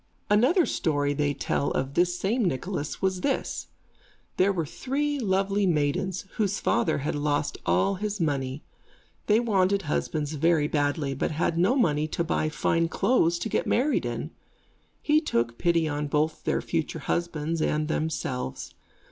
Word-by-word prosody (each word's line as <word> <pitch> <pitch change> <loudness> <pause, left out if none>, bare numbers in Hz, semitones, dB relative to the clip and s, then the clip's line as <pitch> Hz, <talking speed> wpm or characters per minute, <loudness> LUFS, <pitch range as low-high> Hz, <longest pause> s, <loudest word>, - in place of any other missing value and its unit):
Another 260 - +4
story 145 -2 0
they 145 0 0
tell 140 +1 -1
of 135 +1 -2
this 175 +2 +2
same 225 +7 0
Nicholas 170 0 -3
was 190 -1 +1
this. 275 -2 -2 0.7
There 190 +2 +4
were 170 -5 -1
three 285 - -2
lovely 195 -2 +1
maidens, 170 +4 0
whose 205 -2 0
father 160 - +1
had - - 0
lost 145 0 -1
all 90 - +3
his 210 -1 -2
money. 140 -3 -1 0.6
They 215 +1 +5
wanted 200 -4 +2
husbands 150 0 -2
very 155 0 +2
badly, 145 -1 0
but 135 - -1
had 160 +1 0
no 185 +9 +3
money 155 - +2
to 170 - -2
buy 155 -1 0
fine 165 +1 +1
clothes 170 -2 +2
to 175 - -3
get - - -1
married 280 +5 +1
in. - - -4 0.7
He 305 +1 +4
took 115 - -1
pity 170 -2 +2
on 145 0 -2
both 155 +2 -1
their - - +1
future - - -2
husbands 165 -1 -1
and 150 0 0
themselves. 145 - -3
165 Hz, 155 wpm, -26 LUFS, 145-195 Hz, 0.7 s, They